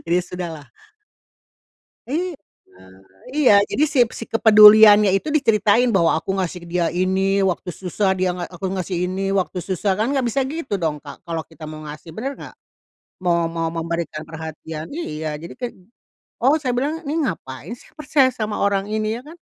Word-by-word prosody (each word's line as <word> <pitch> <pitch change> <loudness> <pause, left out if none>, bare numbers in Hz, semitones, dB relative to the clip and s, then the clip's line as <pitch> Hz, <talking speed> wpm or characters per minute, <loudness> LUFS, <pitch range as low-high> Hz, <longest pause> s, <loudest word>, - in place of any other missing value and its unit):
Jadi 170 +1 +1
sudahlah. 170 -5 -7 1.4
Iya, 350 +6 -2 1.0
iya, 285 -7 +5 0.2
jadi 300 - +2
si 280 - 0 0.2
si 230 - -5
kepeduliannya 215 -2 +8
itu 250 - -3
diceritain 225 -2 +3
bahwa 170 -2 +3
aku 165 - -6
ngasih 180 -1 -3
dia 175 -1 +1
ini, 190 +1 +1 0.3
waktu 180 - -6
susah 190 +2 -1
dia 185 - +1
nga 175 - -4
aku 190 +2 -4
ngasih 185 -1 -3
ini 185 +2 -3 0.2
waktu 180 0 -4
susah, 190 +2 -1
kan 220 - +1
nggak 270 -3 0
bisa 255 +4 0
gitu 315 -10 -4
dong, 155 -2 0
Kak, 145 -1 -9
kalau 165 -1 -3
kita 160 -1 -11
mau 155 - -8
ngasih, 150 +2 -10
bener 270 +5 -3
nggak? - - -10 0.7
Mau 170 -1 +2
mau 165 0 0
memberikan 165 -2 -3
perhatian, 160 0 -7
iya, 155 - -5 0.2
jadi 170 - -9
kayak, 245 -1 -5 0.7
oh 270 +4 +5
saya 250 -2 0
bilang, 290 +5 0
"Ini 290 - -2
ngapain 130 - -5
saya - - -20
percaya 280 -3 +3
sama 215 -1 -3
orang 200 0 +1
ini?" 215 0 -1
Ya - - -16
kan? 330 - -12
190 Hz, 170 wpm, -21 LUFS, 165-230 Hz, 1.4 s, kepeduliannya